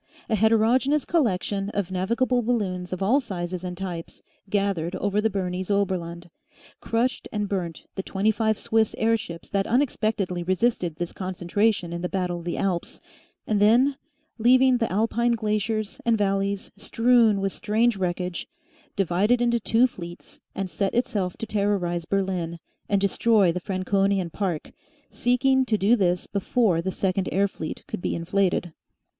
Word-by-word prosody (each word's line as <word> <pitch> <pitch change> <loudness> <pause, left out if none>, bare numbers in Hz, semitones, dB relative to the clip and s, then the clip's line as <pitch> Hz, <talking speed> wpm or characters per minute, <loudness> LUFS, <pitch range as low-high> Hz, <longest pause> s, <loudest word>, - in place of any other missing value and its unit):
A - - +4
heterogeneous 230 +7 +3
collection 200 - 0
of 195 -2 -1
navigable 235 +7 +1
balloons 195 -7 -1
of 185 +1 -2
all 240 +9 +4
sizes 185 -7 -5
and 180 -1 -5
types 175 -3 -6 0.3
gathered 195 -4 0
over 205 +2 0
the 220 - +2
Bernese 185 -1 -3
Oberland, 175 -4 -2 0.5
crushed 235 +3 -1
and 210 -1 -2
burnt 175 -5 -3
the 190 - -3
twenty 195 +3 +1
five 220 0 0
Swiss 225 -2 +1
air 225 +1 +3
ships 170 -6 -7
that 195 -1 0
unexpectedly 215 -8 0
resisted 185 -2 0
this 175 +1 -4
concentration 185 0 -1
in 170 - -4
the 180 - -2
battle 180 -3 -2
of 170 - -11
the 175 - -2
Alps, 180 -3 -2 0.5
and 210 -2 +1
then, 240 +7 +4 0.4
leaving 255 +2 +5
the 230 - -1
Alpine 230 +4 +1
glaciers 215 -1 -2
and 230 -1 +2
valleys 195 -1 -1
strewn 225 0 +3
with 195 0 -1
strange 225 +2 +1
wreckage, 180 -1 -3 0.5
divided 200 +5 +2
into 235 -1 +2
two 230 +3 +3
fleets 175 -8 -8 0.2
and 195 -1 -2
set 195 +3 -2
itself 205 -7 -1
to - - -4
terrorise 200 -5 -1
Berlin 185 -4 -1 0.3
and 200 - +3
destroy 200 -1 +3
the 180 - -3
Franconian 195 0 0
Park, 180 -4 -3 0.4
seeking 260 +2 +2
to 220 -3 +1
do 210 +4 +4
this 180 -5 +1
before 200 -3 +1
the 185 - -2
second 190 0 -1
air 200 +2 +2
fleet 160 -5 -7
could - - -5
be - - -1
inflated. 175 0 0
200 Hz, 155 wpm, -25 LUFS, 180-225 Hz, 0.5 s, leaving